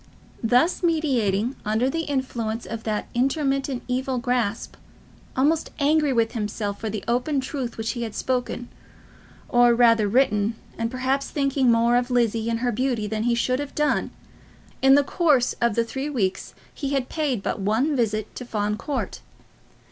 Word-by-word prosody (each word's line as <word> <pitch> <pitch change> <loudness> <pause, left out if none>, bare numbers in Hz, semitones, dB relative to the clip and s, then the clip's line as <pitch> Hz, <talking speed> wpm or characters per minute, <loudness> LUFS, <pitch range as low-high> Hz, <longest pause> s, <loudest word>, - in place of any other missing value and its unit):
Thus 250 +9 +3
meditating, 260 - +1
under 220 +4 +1
the 325 +4 -1
influence 240 -5 -2
of 225 -1 -6
that 215 -1 -2
intermittent 270 0 0
evil 255 +1 -1
grasp, 240 -3 -1 0.6
almost 305 +4 +2
angry 300 0 +3
with 230 -3 +2
himself 210 -2 -3
for 220 - -2
the 210 -1 -4
open 250 +5 +1
truth 260 -2 -4
which 225 0 -2
he 240 - -5
had 225 -3 -4
spoken, 245 -1 -2 0.8
or 240 -1 +5
rather 230 -3 +4
written, 215 -2 +2 0.2
and 230 0 -2
perhaps 260 +2 -1
thinking 275 -3 +2
more 235 +1 +4
of 245 +1 0
Lizzie 230 -2 +1
and 230 0 -1
her 245 -1 +1
beauty 240 -1 -1
than 215 +1 -2
he 240 -1 +2
should 255 +2 0
have 290 -1 -5
done, 300 -1 +1 0.7
in 270 0 +7
the 285 - +5
course 285 -5 +2
of 235 -3 +2
three 265 +5 -1
weeks 205 -10 -2 0.2
he 280 -2 -3
had 265 -2 0
paid 280 -10 -1
but - - -2
one 225 +10 +1
visit 215 -4 -1
to - - -5
Fawn 210 -3 -2
Court. 285 +2 -4
245 Hz, 165 wpm, -24 LUFS, 225-270 Hz, 0.8 s, in